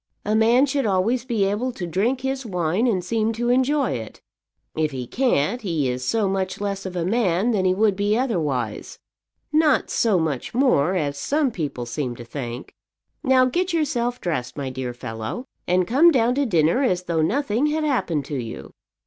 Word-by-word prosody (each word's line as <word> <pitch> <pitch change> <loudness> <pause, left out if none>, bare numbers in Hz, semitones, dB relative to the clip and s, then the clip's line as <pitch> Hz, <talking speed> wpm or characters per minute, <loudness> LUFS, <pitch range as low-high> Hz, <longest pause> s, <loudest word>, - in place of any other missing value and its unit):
A 210 - 0
man 230 +5 +5
should 275 -3 -1
always 215 +6 +1
be 225 -6 +1
able 210 +6 -1
to 180 - -5
drink 215 +10 0
his 265 0 -2
wine 180 +1 0
and 185 -7 0
seem 225 +2 0
to 240 +2 -1
enjoy 260 +2 +2
it. 115 -4 -6 0.6
If 155 -1 +1
he 130 -3 -5
can't, 240 - 0
he 160 - -1
is 125 +1 -4
so 210 - +1
much 190 -1 -2
less 200 -1 -3
of 185 - -7
a 170 -2 -1
man 200 0 +1
than 195 -4 +1
he 185 0 +3
would 210 0 +2
be 205 +2 +1
otherwise, 150 - -2 0.6
not 305 -2 +3
so 220 -5 +2
much 160 - -2
more, 190 - +3
as 145 -5 -1
some 290 - +1
people 145 - -4
seem 125 0 -3
to 120 - -10
think. 120 -1 -6 0.5
Now 260 -2 +4
get 350 +8 0
yourself 250 -7 0
dressed, 125 -8 -3
my 135 -2 -3
dear 130 -1 -5
fellow, 115 - -5 0.2
and 180 0 +2
come 280 - +5
down 245 -5 +3
to 280 +1 0
dinner 170 - +2
as 185 -9 +1
though 170 -3 0
nothing 250 - +1
had 310 +1 0
happened 185 - 0
to 145 - -4
you." 115 - -8
200 Hz, 190 wpm, -23 LUFS, 155-250 Hz, 0.6 s, man